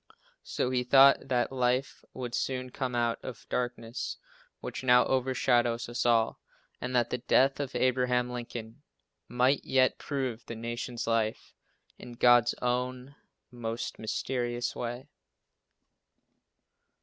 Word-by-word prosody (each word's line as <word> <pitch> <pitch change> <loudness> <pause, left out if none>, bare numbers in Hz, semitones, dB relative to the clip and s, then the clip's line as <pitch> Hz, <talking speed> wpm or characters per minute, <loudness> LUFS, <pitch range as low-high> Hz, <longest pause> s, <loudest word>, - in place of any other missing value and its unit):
So 125 - -2
he 125 -1 +1
thought 135 +2 +6
that 125 -2 0
life 130 +1 0
would 125 -2 -6
soon 130 -1 -2
come 125 -2 -3
out 120 -1 0
of 125 -3 -8
darkness, 120 -1 -3 0.4
which - - -6
now 125 -1 +5
overshadows 120 -2 +1
us 120 0 -1
all, 115 -2 +2 0.4
and 125 0 -3
that 120 -1 +2
the 125 - -1
death 135 +3 +3
of 140 -2 -4
Abraham 125 -1 +1
Lincoln 120 0 -7 0.5
might 125 +3 +2
yet 130 -1 +2
prove 130 -5 -3
the 115 - -6
nation's 120 +1 -4
life 115 -1 -1 0.5
in 125 - -10
God's 120 0 +4
own 125 +2 -2 0.4
most 115 -1 -5
mysterious 120 +2 -2
way. 120 +3 -5
125 Hz, 125 wpm, -29 LUFS, 120-130 Hz, 0.5 s, thought